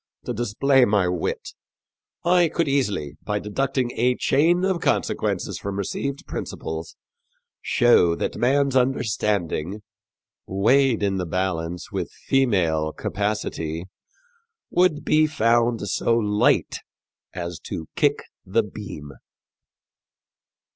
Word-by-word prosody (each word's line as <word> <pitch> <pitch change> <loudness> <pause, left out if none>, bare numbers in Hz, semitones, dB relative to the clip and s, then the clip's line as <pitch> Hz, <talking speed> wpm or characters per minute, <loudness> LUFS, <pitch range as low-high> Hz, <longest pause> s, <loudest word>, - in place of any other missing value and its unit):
to - - -2
display 125 +4 +2
my 100 -5 +3
wit, 90 -2 -2 0.8
I 175 0 +5
could 165 0 0
easily, 105 - -1
by 105 0 -2
deducting 125 +4 -1
a 125 +2 +1
chain 175 +9 +2
of 190 -3 0
consequences - - -1
from 100 -1 -4
received 140 +8 -3
principles, 80 0 -6 0.7
shew 90 -8 +4
that - - -3
man's 135 +2 +2
understanding, 105 - 0 0.6
weighed 115 +4 +3
in 100 -1 +1
the 90 -2 -2
balance 90 -1 -2
with - - -3
female 90 -13 +2
capacity, 95 -5 -3 0.9
would 175 -4 +2
be 155 0 +4
found 115 -5 +1
so 115 +4 +1
light 105 -2 +2 0.6
as 85 -3 -5
to 80 - -5
kick - - +2 0.2
the 110 +5 +1
beam." 95 -8 -8
105 Hz, 105 wpm, -23 LUFS, 90-135 Hz, 0.9 s, I